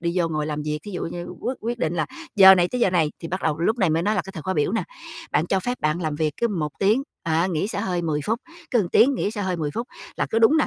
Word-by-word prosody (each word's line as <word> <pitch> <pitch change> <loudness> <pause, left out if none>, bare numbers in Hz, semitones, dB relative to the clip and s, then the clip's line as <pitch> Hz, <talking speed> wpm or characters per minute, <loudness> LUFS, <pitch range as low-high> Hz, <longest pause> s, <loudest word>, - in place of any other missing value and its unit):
đi 170 0 -1
vô 170 -2 +2
ngồi 155 -2 -2
làm 150 -1 -3
việc. 150 0 -2
Thí 210 - -7
dụ 180 - -4
như 175 +1 -5
quyết 250 +3 -2
quyết 235 +2 -3
định 165 -3 -1
là 155 -3 0 0.3
giờ 190 -1 +10
này 175 -1 +2
tới 250 - -3
giờ 195 - +4
này 160 -4 +2
thì 165 - -6
bắt 185 +3 -3
đầu 155 -2 0
lúc 220 +8 +1
này 190 -6 +3
mới 160 +2 +1
nói 210 +4 +1
là - - 0
cái 195 - -9
thời 160 - -7
khóa 190 +3 -2
biểu 150 +4 +1
nè, 225 - +1 0.5
bạn 160 - +2
cho 190 +1 +1
phép 245 +6 -3
bạn 155 +3 0
làm 155 -2 -1
việc 155 -1 0
cứ 235 - +1
một 165 -8 -2
tiếng, 215 +7 +3 0.2
á, 165 +1 +1
nghỉ 170 +4 -1
xả 200 - -3
hơi 180 -4 -1
10 155 -3 -1
phút, 225 +3 0 0.3
cứ 245 - +3
một 190 -6 +1
tiếng 265 +9 +5
nghỉ 210 - -1
xả 210 -2 -4
hơi 185 -2 -1
10 155 -3 -2
phút, 235 +8 -4 0.3
là - - 0
cứ 225 - +2
đúng 230 +7 +5
nà 310 - +3
180 Hz, 320 wpm, -23 LUFS, 160-215 Hz, 0.5 s, giờ